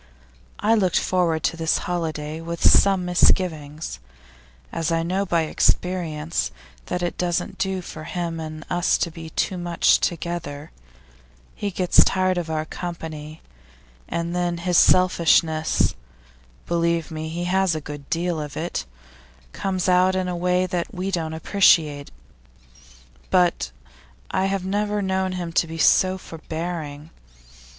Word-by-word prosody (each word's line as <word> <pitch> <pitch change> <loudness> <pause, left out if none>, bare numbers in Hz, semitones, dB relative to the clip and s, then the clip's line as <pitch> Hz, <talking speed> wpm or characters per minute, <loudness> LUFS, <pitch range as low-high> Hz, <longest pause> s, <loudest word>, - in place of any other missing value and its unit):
I 220 - +2
looked 190 -6 +2
forward 170 -4 +1
to - - +1
this 165 -1 +1
holiday 160 -3 -3
with 170 0 0
some 195 -2 +5
misgivings, 160 -4 +1 0.7
as 165 0 -2
I 165 0 +1
know 190 +4 -1
by 170 -2 +2
experience 160 - 0 0.4
that 180 - -2
it 175 - -3
doesn't 180 +1 -1
do 190 -1 -1
for 155 -2 -8
him 170 -2 -3
and 155 -1 -7
us 175 0 +2
to 170 - -1
be 160 0 -9
too 180 +3 -1
much 175 -1 +3
together; 165 -3 -3 0.8
he 205 - -3
gets 180 -2 +4
tired 185 -1 +1
of 170 -2 -5
our 155 -1 -1
company, 160 -3 -7 0.6
and 170 +1 -3
then 175 -1 0
his 175 +1 -1
selfishness 165 -3 +3 0.7
believe 170 -1 0
me, 160 0 -4
he 170 +2 -4
has 185 -1 +2
a - - -2
good 145 -1 -9
deal 170 -1 -1
of 150 -1 -7
it 170 - -3 0.7
comes 190 -2 -2
out 185 +1 +4
in 185 -1 0
a 180 - -2
way 180 +1 +1 0.2
we 190 +1 -3
don't 165 -3 -2
appreciate. 160 -5 +3 1.2
But 175 - +2 0.6
I 190 - +1
have 195 -1 -2
never 205 +1 -1
known 190 -1 0
him 175 -2 -4
so 170 +3 +3
forbearing. 160 -3 -6
170 Hz, 135 wpm, -23 LUFS, 160-185 Hz, 1.2 s, some